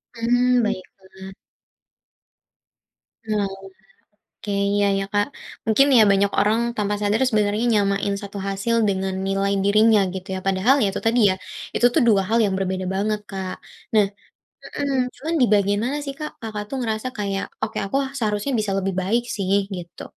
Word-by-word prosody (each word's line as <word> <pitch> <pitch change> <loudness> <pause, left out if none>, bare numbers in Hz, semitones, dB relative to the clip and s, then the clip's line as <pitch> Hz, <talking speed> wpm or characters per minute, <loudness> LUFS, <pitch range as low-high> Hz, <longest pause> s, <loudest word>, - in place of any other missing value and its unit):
Hmm 245 +1 +2
baiklah. 190 -1 -6 1.9
Oalah. 210 -2 0 1.0
Oke 210 - -5 0.2
iya 205 0 +2
ya, 195 - -1
Kak. 205 0 +2 0.4
Mungkin 225 +6 +4
ya - - +8
banyak 200 +1 +2
orang 215 +3 +2 0.2
tanpa 210 -1 0
sadar 210 +2 +1
sebenernya 210 0 +1
nyamain 200 -1 +1
1 200 0 -7
hasil 195 +4 -1
dengan 190 -1 -1
nilai 195 +1 0
dirinya 215 +1 +5
gitu 190 +1 -7
ya, - - -3
padahal 195 +7 +3
ya 205 - +3
itu 195 - -4
tadi 235 +2 +3
ya, - - +1 0.4
itu 245 - +4
tuh 315 - +4
dua 200 -3 +4
hal 230 - +2
yang 195 -2 0
berbeda 185 -1 -2
banget, 210 +2 -1
Kak. 190 -1 -4 0.4
Nah 210 -2 +5 0.7
mmm 275 -2 0 0.2
cuma 315 - -6
di - - +7
bagian 205 +1 +2
mana 285 +3 -1
sih, 275 - -4
Kak, 305 0 -4
Kakak 215 -2 -4
tuh 270 - -4
ngerasa 220 0 -2
kayak, 200 -1 -2 0.2
"Oke 220 - -3
aku, 195 - -4
ah, 265 - -11
seharusnya 210 +2 -1
bisa 210 -2 -1
lebih 195 0 -2
baik 230 +6 +1
sih," 195 0 +1 0.2
gitu? 175 -1 -9
205 Hz, 165 wpm, -22 LUFS, 195-225 Hz, 1.9 s, ya